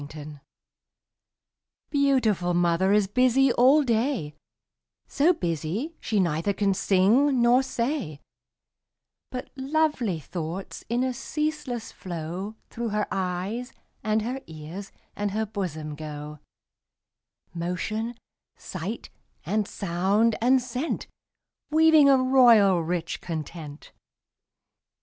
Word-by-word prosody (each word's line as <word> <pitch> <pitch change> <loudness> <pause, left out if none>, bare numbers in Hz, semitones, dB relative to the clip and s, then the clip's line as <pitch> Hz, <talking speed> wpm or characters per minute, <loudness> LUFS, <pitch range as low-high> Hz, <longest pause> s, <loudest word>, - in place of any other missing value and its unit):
_ 150 -1 -10 1.5
Beautiful 235 - +2
mother 175 +2 +2
is 210 -1 +4
busy 255 +4 +3
all 270 +5 +5
day, 230 - 0 0.7
So 305 +5 +3
busy 180 - -3
she 215 -3 -1
neither 170 +2 +1
can 195 0 +1
sing 225 +10 +3
nor 240 +2 +5
say; 240 - -3 1.1
But 250 0 -6
lovely 270 - 0
thoughts, 170 +4 -6
in 240 +2 +1
a 260 -1 0
ceaseless 290 -3 -3
flow, 180 +4 -6 0.2
Through 235 0 -3
her 210 0 0
eyes, 190 +6 -3 0.3
and 215 0 +1
her 255 +4 -3
ears, 160 +5 -8 0.2
and 205 0 -1
her 220 +1 0
bosom 170 -8 -4
go 150 0 -7 1.1
Motion, 215 +7 -3 0.4
sight, - - -6 0.3
and 210 -1 0
sound, 200 +5 +1
and 255 +3 +5
scent, 255 +5 -3 0.6
Weaving 315 -2 +6
a 270 - +6
royal, 240 -8 +5
rich 165 0 -3
content. 155 -2 -7
210 Hz, 105 wpm, -26 LUFS, 175-255 Hz, 1.5 s, Weaving